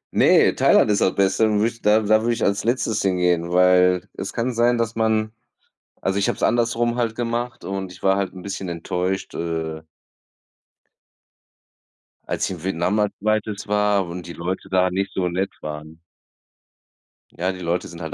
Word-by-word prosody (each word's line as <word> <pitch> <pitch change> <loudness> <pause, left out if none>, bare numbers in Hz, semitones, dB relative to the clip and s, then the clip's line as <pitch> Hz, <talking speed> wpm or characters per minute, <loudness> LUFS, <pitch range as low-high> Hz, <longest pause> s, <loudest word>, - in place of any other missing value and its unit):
Ne, - - +5
Thailand - - +4
ist 100 - +1
das 95 - +2
Beste, 100 +3 +2
und 105 - +1
würde 110 +2 +2
ich 115 0 -15
da 105 +1 +4
da 110 +1 +3
würde 120 +1 +1
ich - - -3
als 100 0 0
Letztes 115 -2 0
hingehen, 90 -2 +1
weil 90 +1 +4
es 95 - -5
kann 120 +2 -2
sein, 120 +1 +2
dass 115 -1 -1
man 110 -1 +1 0.7
also 95 +1 -1
ich 100 - +1
habe - - -2
es - - -6
andersrum 120 0 +1
halt 115 -2 -1
gemacht 120 +1 -3
und 95 -1 -4
ich - - -14
war 95 0 +4
halt 100 -1 -2
'n 95 - -10
bisschen 95 -1 -5
enttäuscht, 90 +3 -3
äh 80 -1 -3 2.4
als - - -1
ich - - -3
in 85 - -13
Vietnam 95 +2 0
als 105 -1 +1
2. 110 0 -1
war 105 -1 +2
und 85 +1 -7
die 85 - -7
Leute 95 +3 -5
da 95 -1 +2
nicht 95 +1 -2
so 90 -1 0
nett 95 +3 -2
waren. 75 +1 -8 1.3
Ja, 90 +2 -2
die 95 - -9
Leute 85 +1 -2
sind 85 0 -10
halt 80 -2 -5
95 Hz, 185 wpm, -22 LUFS, 90-110 Hz, 2.4 s, Ne